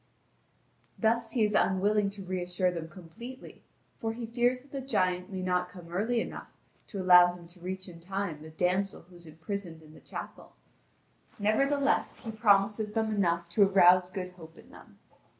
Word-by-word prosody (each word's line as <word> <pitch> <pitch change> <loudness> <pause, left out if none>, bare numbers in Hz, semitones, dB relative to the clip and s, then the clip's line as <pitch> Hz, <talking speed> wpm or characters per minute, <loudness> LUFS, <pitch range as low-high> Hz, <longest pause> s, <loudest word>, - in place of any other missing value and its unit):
Thus 230 0 +1
he 235 - +2
is 210 0 +1
unwilling 200 +2 +2
to 200 0 -8
reassure 180 0 -1
them 165 -2 -6
completely, 225 +10 -11 0.4
for 225 0 -3
he 235 0 -5
fears 245 +2 +1
that 275 - -22
the 275 - -4
giant 185 -8 0
may 185 -1 -4
not 180 -1 0
come 175 -2 -12
early 225 +6 +1
enough - - -5 0.4
to 200 - -6
allow 180 -1 +7
him 175 -1 -13
to 175 +2 -13
reach 185 +2 -5
in 170 -2 -11
time 185 -3 -4
the 160 - -10
damsel 180 +4 -1
who 180 +1 -19
is 170 -1 -12
imprisoned 165 +1 -6
in 155 0 -16
the - - -14
chapel. - - -9 0.9
Nevertheless, 275 +7 +1
he 225 - -7
promises 210 -1 +2
them 220 -1 0
enough 170 -4 +1
to 185 +5 +1
arouse 180 -1 +6
good 185 -1 -5
hope 165 -3 -14
in - - -16
them. - - -16
190 Hz, 175 wpm, -29 LUFS, 180-220 Hz, 0.9 s, allow